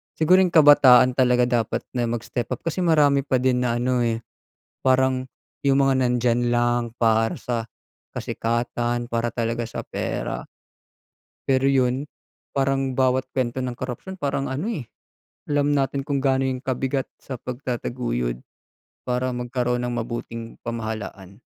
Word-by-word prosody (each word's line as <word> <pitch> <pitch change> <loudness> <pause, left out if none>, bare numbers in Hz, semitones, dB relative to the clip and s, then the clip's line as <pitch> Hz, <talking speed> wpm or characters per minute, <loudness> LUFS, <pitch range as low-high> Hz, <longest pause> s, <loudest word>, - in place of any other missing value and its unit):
siguro 180 +4 +5
yung 185 -2 +3
kabataan 140 -5 +8
talaga, 125 -1 +4 0.2
dapat - - -4
na 120 -2 -1
mag-step 120 +1 -3
up - - -22
kasi 165 +2 -2
marami 145 -5 +3
pa 130 -1 +1
din 130 -1 +3
na 120 -1 0
ano, 125 +1 +1
eh, 115 -1 0 0.6
parang 130 0 +2 0.4
yung 140 0 +4
mga - - +3
nandiyan 120 -1 +1
lang 120 0 +2
para 115 -1 +2
sa 115 -2 -3 0.5
kasikatan 120 +1 -2
para 115 -1 -1
talaga 115 0 -1
sa 115 - -5
pera. - - -3 1.0
Pero 135 0 +3
yun, 135 0 +2 0.5
parang 135 -1 0
bawat 130 0 +2
kuwento 130 0 -1
ng 125 - -2
korapsiyon 130 +10 -6
parang 140 -1 -1
ano, 150 +11 -2
eh, 195 - -3 0.6
alam 145 0 +2
natin 140 -1 0
kung 140 -1 -1
gaano 135 -1 +2
'yon 130 -1 -1
kabigat 130 0 -2
sa 130 -3 -8
pagtataguyod 120 - -3 0.7
para 125 +1 0
magkaroon 125 0 -1
ng 120 0 -2
mabuting 115 0 -5
pamahalaan. 110 -4 -6
125 Hz, 140 wpm, -23 LUFS, 120-135 Hz, 1.0 s, kabataan